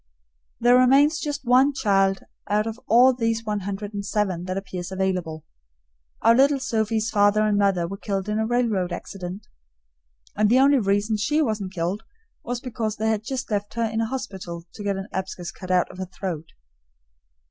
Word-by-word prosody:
There 245 +1 +5
remains 280 +5 +5
just 290 -2 -4
one 260 +4 +4
child 195 -5 +2 0.3
out 210 +1 +2
of 225 +1 -5
all 250 +3 +6
these 230 -2 -1
one 210 -1 -1
hundred 200 +2 -5
and 200 0 -4
seven 195 -4 -1
that 185 +1 -3
appears 185 -2 -6
available. 185 -5 -2 0.8
Our 230 - +6
little 275 +3 +4
Sophie's 225 -3 -1
father 205 +1 +3
and 210 -1 +2
mother 195 -4 +2
were 195 +3 -6
killed 195 -1 -3
in 210 +1 -1
a 220 - 0
railroad 225 -7 0
accident, 185 +2 -7 0.9
and 210 0 +3
the 245 - +5
only 275 +1 +5
reason 205 +1 +1
she 295 +9 +1
wasn't 215 -9 -1
killed 175 +5 -2 0.4
was 245 0 -3
because 225 -4 -3
they 220 +1 -1
had 215 -1 -1
just 260 +1 -4
left 205 +1 -2
her 235 - 0
in 220 0 -1
a 225 - 0
hospital 190 -10 -6
to 205 - -8
get 200 -1 -1
an 195 +1 -5
abscess 185 -2 -4
cut 185 - -11
out 180 -1 +2
of 180 - -12
her 185 - -4
throat. 175 -4 -5
210 Hz, 185 wpm, -24 LUFS, 190-235 Hz, 0.9 s, all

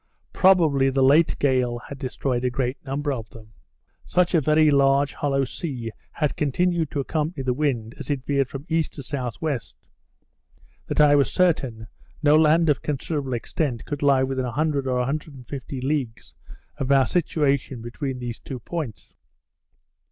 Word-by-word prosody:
Probably 160 -8 +4
the 135 0 +1
late 150 +5 +4
gale 130 -3 +1
had 135 +3 -10
destroyed 130 -2 -2
a 125 - +2
great 125 +1 -3
number 145 +1 -2
of 115 -4 -6
them. 110 -2 -15 0.5
Such 180 0 +1
a 165 - +4
very 155 +1 +4
large 140 0 +3
hollow 135 -1 0
sea 125 -4 -5 0.2
had 150 -3 -1
continued 165 +2 0
to 145 - -3
accompany 150 0 -2
the 130 -1 +1
wind 120 -5 -1
as 145 - -8
it 135 -3 -2
veered 140 -2 +1
from 135 +1 -7
E. 165 0 +2
to 155 - -7
S.W. 135 +1 -3 1.3
that - - -2
I 150 -1 +6
was 140 -1 +3
certain 135 -11 +1 0.4
no 150 0 +6
land 160 +2 +4
of 145 -3 +2
considerable 145 -2 -3
extent 120 0 -2
could 145 -1 -5
lie 140 -2 +4
within 130 -1 -1
100 140 +2 -1
or 125 -1 +1
150 135 -1 -4
leagues 130 -4 -3 0.4
of 135 0 -1
our 135 -1 +5
situation 140 -6 0
between 130 +2 -4
these 120 -2 -5
two 130 - -7
points. 145 - -6
140 Hz, 160 wpm, -24 LUFS, 125-150 Hz, 1.3 s, I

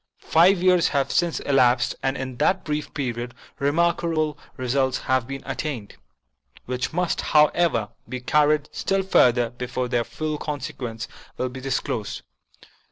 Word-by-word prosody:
Five 175 +3 +5
years 180 -2 +5
have 140 -2 0
since 170 -2 +1
elapsed, 130 -3 +3
and 135 +1 -1
in 130 -2 -5
that 185 +8 +2
brief 150 0 -3
period 120 -3 -4 0.2
remarkable 155 +1 +1 0.2
results 130 0 +1
have 130 -2 0
been 135 0 -6
attained, 135 -5 -4 0.7
which 125 0 -2
must, 180 +1 0
however, 150 - +3 0.2
be 130 - -4
carried 150 +3 +2
still 195 0 0
further 120 -10 +4
before 125 0 -3
their 120 -1 +1
full 155 +4 -4
consequence 130 -4 -5 0.3
will 130 - -1
be 130 +1 -8
disclosed. 135 0 -3
135 Hz, 135 wpm, -24 LUFS, 125-155 Hz, 0.7 s, Five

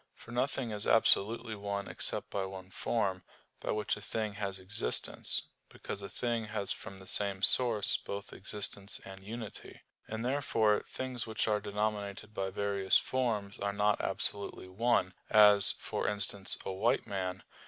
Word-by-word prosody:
For 120 - -14
nothing 125 -1 -1
is 105 0 -2
absolutely 115 +1 +3
one 100 -1 -4
except - - -1
by 100 - -2
one 95 0 -9
form, 95 -3 -1 0.4
by - - -7
which 105 -1 -1
a 105 - -11
thing 110 0 -3
has 100 -1 -4
existence: 95 +4 +2 0.3
because 100 - -7
a 100 - -7
thing 120 -2 -2
has 105 -2 -2
from 95 - -7
the 95 - -13
same 100 0 +4
source 115 -5 +7
both 100 0 -7
existence 100 0 -3
and 95 0 -10
unity; 110 +1 -9 0.3
and 110 +2 -4
therefore 115 -6 +1
things 130 -3 -3
which 110 -1 -2
are 105 -1 +1
denominated 105 0 -3
by 95 -2 -3
various 100 0 +1
forms 110 -6 -2
are 100 0 -2
not 105 0 +1
absolutely 100 -2 -4
one; 95 -1 0 0.2
as, 105 -2 +7
for - - -3
instance, 100 -1 +2
"a - - -3
white 100 +5 0
man." 95 -2 -4
105 Hz, 155 wpm, -31 LUFS, 100-110 Hz, 0.4 s, source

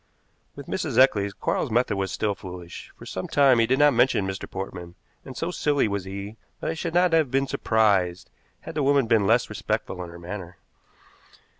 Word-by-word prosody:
With - - -9
Mrs. - - -3
Eccles 105 -7 +4
Quarles's - - -1
method 115 -1 +1
was 95 -1 -2
still 105 0 -1
foolish. 90 -3 -10
For - - -12
some 95 - -5
time 135 -4 +4
he 115 - +3
did 130 +2 +2
not 145 0 +5
mention 120 -4 +3
Mr. 95 +1 -5
Portman, 90 -2 -7 0.3
and 130 -2 -10
so 170 - -2
silly 145 -7 +1
was 100 -2 -3
he 100 +3 -7 0.2
that - - -2
I - - -2
should 165 +1 -4
not 180 -1 +4
have 160 -4 +3
been 135 +2 +1
surprised 100 -8 +1 0.3
had - - -8
the 155 - -1
woman 140 -1 +3
been 110 -3 +2
less 115 +3 +3
respectful 90 - -3
in 85 - -8
her 85 - -11
manner. 90 0 -8
110 Hz, 195 wpm, -25 LUFS, 95-135 Hz, 0.3 s, not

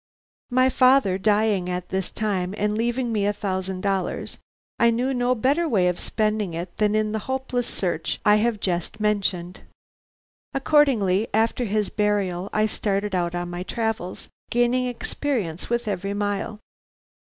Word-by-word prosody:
"My 255 +1 +4
father 255 -8 +4
dying 205 -2 +2
at 180 0 -3
this 190 -1 -2
time 195 -3 -2
and 210 0 0
leaving 240 +2 0
me 205 -2 +1
a 205 - +1
thousand 190 -2 -3
dollars, 195 -2 -2 0.4
I 235 - +5
knew 245 +4 0
no 245 0 +1
better 285 +8 +1
way 190 -8 +3
of 180 -1 0
spending 215 -5 -1
it 175 +1 -5
than 210 0 +2
in 215 0 +1
the 220 - -1
hopeless 260 -2 -1
search 170 -4 -2
I 210 0 +6
have 220 0 +1
just 175 0 -2
mentioned. 195 -4 0 1.0
Accordingly 255 -9 +3
after 225 +2 +1
his 210 -1 0
burial 200 -3 0
I 215 0 +2
started 205 -1 -1
out 175 -1 0
on 175 0 -3
my 175 0 -4
travels, 220 -2 -3 0.2
gaining 245 +1 +2
experience 235 - -3
with 240 0 -1
every 200 0 -2
mile. 205 +1 -2
210 Hz, 155 wpm, -24 LUFS, 190-235 Hz, 1.0 s, I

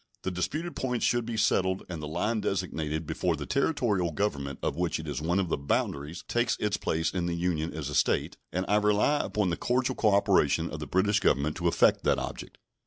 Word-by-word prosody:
The 95 - -1
disputed 150 - -3
points 125 -2 -1
should 120 -1 +1
be 115 -2 -3
settled 95 -3 +2
and 85 -3 -6
the 75 - -5
line 105 +8 -1
designated 80 -5 -2
before - - 0
the - - -6
Territorial 120 - +1
government 70 -6 -2
of - - 0
which 85 0 -1
it 80 - -7
is 75 -1 -3
one 85 +4 0
of 95 -3 0
the 75 - -1
boundaries 70 +3 -2
takes 120 +1 +1
its 105 -1 0
place 80 +1 -1
in 90 -2 -1
the 85 - -1
Union 85 -2 -1
as 75 -3 -5
a 75 - -5
State, - - +1 0.2
and 90 +1 -1
I 105 - +3
rely 105 +8 +3
upon 105 -4 0
the 85 - -1
cordial 125 +1 0
cooperation 100 -2 +3
of - - -5
the - - -5
British 100 +3 +2
Government 75 +3 +1
to 85 -1 0
effect 85 - +3
that - - +3
object. - - -6
90 Hz, 215 wpm, -28 LUFS, 80-105 Hz, 0.2 s, I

